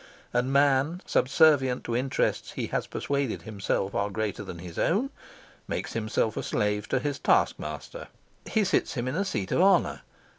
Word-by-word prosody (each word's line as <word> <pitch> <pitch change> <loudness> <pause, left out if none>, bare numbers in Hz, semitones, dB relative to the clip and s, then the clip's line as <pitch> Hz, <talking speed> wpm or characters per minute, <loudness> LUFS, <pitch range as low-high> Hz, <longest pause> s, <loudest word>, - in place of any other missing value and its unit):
And 125 +2 +1
man, 140 +5 +3
subservient 135 -3 +3
to 115 - -2
interests 130 +2 0
he - - -3
has - - -2
persuaded 140 -4 -2
himself 100 -2 -2
are 100 0 0
greater 110 -1 -3
than 85 - -7
his 85 -1 -8
own, 235 - +1 0.6
makes - - -3
himself 110 -1 0
a - - -2
slave 105 0 -1
to - - +2
his 140 +2 -2
taskmaster. - - 0 0.4
He 220 - +2
sits 190 -5 +1
him 120 -1 -2
in 130 - -2
a 195 - +1
seat 100 - -3
of - - +3
honour. 190 -2 +3
130 Hz, 170 wpm, -27 LUFS, 110-155 Hz, 0.6 s, man